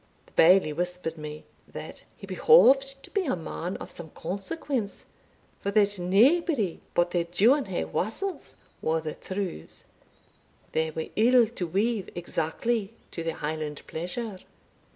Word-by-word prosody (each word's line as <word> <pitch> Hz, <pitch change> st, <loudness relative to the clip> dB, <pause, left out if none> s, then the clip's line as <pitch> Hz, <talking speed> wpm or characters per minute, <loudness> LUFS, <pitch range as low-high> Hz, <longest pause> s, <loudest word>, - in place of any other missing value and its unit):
The -, -, -23 dB
Bailie 175 Hz, -2 st, +5 dB
whispered 175 Hz, 0 st, -2 dB
me, 150 Hz, -1 st, -8 dB, 0.2 s
that -, -, -9 dB
"he -, -, -9 dB
behoved 275 Hz, -, +5 dB
to -, -, -10 dB
be 400 Hz, -3 st, 0 dB
a 255 Hz, -, +1 dB
man 175 Hz, +2 st, -5 dB
of -, -, -8 dB
some 170 Hz, -2 st, -9 dB
consequence, 200 Hz, -, -4 dB, 0.5 s
for 200 Hz, -, -2 dB
that 205 Hz, -1 st, +2 dB
naebody 225 Hz, -, +3 dB, 0.2 s
but 175 Hz, 0 st, +3 dB
their 175 Hz, -1 st, +1 dB
Duinhe'wassels 220 Hz, -, 0 dB, 0.3 s
wore 160 Hz, +1 st, +1 dB
the 155 Hz, -1 st, -4 dB
trews 185 Hz, -, -6 dB, 0.9 s
they 160 Hz, 0 st, 0 dB
were 160 Hz, 0 st, -5 dB
ill 240 Hz, +2 st, +6 dB
to 210 Hz, -6 st, -5 dB
weave 205 Hz, +3 st, 0 dB
exactly 195 Hz, +6 st, -2 dB, 0.2 s
to 165 Hz, -, -5 dB
their 165 Hz, -1 st, -2 dB
Highland 150 Hz, -1 st, -4 dB
pleasure." 185 Hz, +5 st, -5 dB
190 Hz, 130 wpm, -27 LUFS, 165-235 Hz, 0.9 s, ill